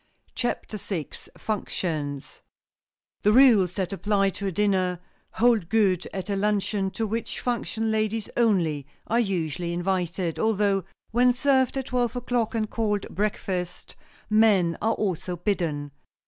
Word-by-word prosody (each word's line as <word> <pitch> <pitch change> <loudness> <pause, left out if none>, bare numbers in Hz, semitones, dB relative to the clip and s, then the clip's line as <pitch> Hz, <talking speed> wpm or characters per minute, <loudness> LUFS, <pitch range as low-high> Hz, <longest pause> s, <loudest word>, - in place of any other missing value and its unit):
CHAPTER 240 -3 -3
VI 180 -7 -4 0.3
FUNCTIONS 155 -9 -3 0.8
THE 210 - +4
rules 225 -9 +6
that 190 -1 -2
apply 195 0 +1
to 200 +1 -4
a - - -1
dinner 185 -2 +1 0.3
hold 225 -7 +3
good 195 -5 +2
at 190 -1 -5
a 200 - -1
luncheon, 200 -1 0
to 225 +3 -3
which 225 +2 -3
function 225 -2 -1
ladies 215 0 0
only 170 - +2 0.2
are 230 - +1
usually 175 - -1
invited, 175 -1 -1
although 205 -4 +2 0.3
when 245 +2 +4
served 265 0 +2
at 265 - -2
twelve 245 -2 0
o'clock, 245 -2 -1
and 220 -1 0
called 210 -3 -1
"breakfast," 185 -3 -3 0.3
men 210 -6 +4
are 225 +2 +2
also 180 -3 -2
bidden. 165 -6 -1
200 Hz, 135 wpm, -26 LUFS, 180-225 Hz, 0.8 s, rules